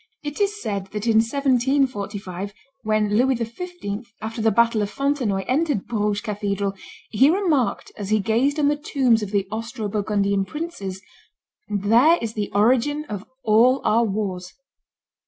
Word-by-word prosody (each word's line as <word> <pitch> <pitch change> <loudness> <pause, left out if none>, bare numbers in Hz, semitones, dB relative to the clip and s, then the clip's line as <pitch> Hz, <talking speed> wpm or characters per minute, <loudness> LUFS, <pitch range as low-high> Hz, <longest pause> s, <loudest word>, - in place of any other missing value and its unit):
It 295 +5 -4
is 410 +1 0
said 200 - -3
that 210 +1 -3
in 225 -2 +3
1745, 230 -6 0 0.3
when 215 -2 +1
Louis 260 +3 +3
XV., 235 - -6
after 220 +1 -5
the 225 - +4
battle 230 0 +3
of 205 - -1
Fontenoy, 260 -7 -1
entered 285 -5 0
Bruges 210 -2 -1
cathedral, 200 -2 -2 0.4
he 260 +6 +5
remarked, 330 - +1
as 200 -2 -6
he 215 0 +3
gazed 235 +8 +1
on 295 -2 +2
the 295 - +3
tombs 260 -6 +2
of 210 - -4
the 200 -1 0
Austro 225 0 -4
Burgundian 200 -1 0
princes, 200 - -6 0.7
"There 225 - +4
is 225 -1 -4
the 210 -2 -3
origin 250 +8 +2
of 205 -1 -5 0.2
all 240 +4 +4
our 230 +2 +4
wars." 195 -4 -3
220 Hz, 150 wpm, -23 LUFS, 205-265 Hz, 0.7 s, he